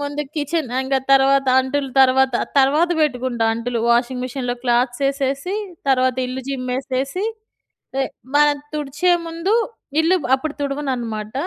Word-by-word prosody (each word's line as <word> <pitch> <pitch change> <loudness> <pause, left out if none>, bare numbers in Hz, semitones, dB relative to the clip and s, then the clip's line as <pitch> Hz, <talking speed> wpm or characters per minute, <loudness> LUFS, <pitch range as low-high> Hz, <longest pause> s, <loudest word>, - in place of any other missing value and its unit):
ముందు 285 +1 -3
కిచెన్ 300 -1 -1
ఇంగ 265 +1 -1 0.2
తర్వాత 270 0 +4
అంటులు 270 +1 -2
తర్వాత, 265 -1 +4 0.2
తర్వాత 295 +6 +4
పెట్టుకుంటా 255 -5 0
అంటులు. 235 +1 -3
వాషింగ్ 250 +1 +1
మిషన్‍లో 250 -1 -3
క్లాత్స్ 245 +1 +1
యేసేసి 275 +6 -1 0.3
తర్వాత 255 -1 +2
ఇల్లు 255 +1 -5
చిమ్మేసేసి, 265 +6 -2 1.1
మనం 295 0 +4 0.2
తుడిచే 300 +5 0
ముందు 335 +6 -1 0.5
ఇల్లు 340 +4 +3 0.2
అప్పుడు 295 +2 -3
తుడవనన్నమాట. 250 -7 -3
270 Hz, 115 wpm, -20 LUFS, 255-290 Hz, 1.1 s, తర్వాత